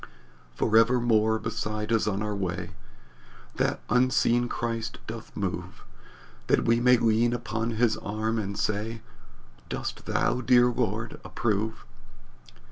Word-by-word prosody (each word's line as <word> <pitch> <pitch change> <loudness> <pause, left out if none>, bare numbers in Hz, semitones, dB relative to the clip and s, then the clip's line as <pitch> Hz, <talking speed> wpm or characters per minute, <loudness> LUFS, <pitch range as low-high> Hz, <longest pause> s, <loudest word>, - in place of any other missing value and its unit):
"Forever 115 - +4
more 110 -2 +3
beside 110 0 -3
us 115 - +2
on 100 0 -1
our 105 -1 -2
way, 90 -3 -3 0.9
The - - +1
unseen 120 -1 +2
Christ 115 -1 -3
doth - - -8
move, - - -4 0.6
That - - +3
we 115 0 +3
may 125 +1 +5
lean 115 +1 +2
upon 115 -1 -2
his 115 -2 +2
arm 110 +2 -2
and 100 -1 -4
say, 110 +2 -2 0.7
'Dost - - -5
thou, 125 - +1
dear 120 +1 +5
Lord, 115 -1 -2
approve?'" 110 0 -2
115 Hz, 125 wpm, -27 LUFS, 110-120 Hz, 0.9 s, may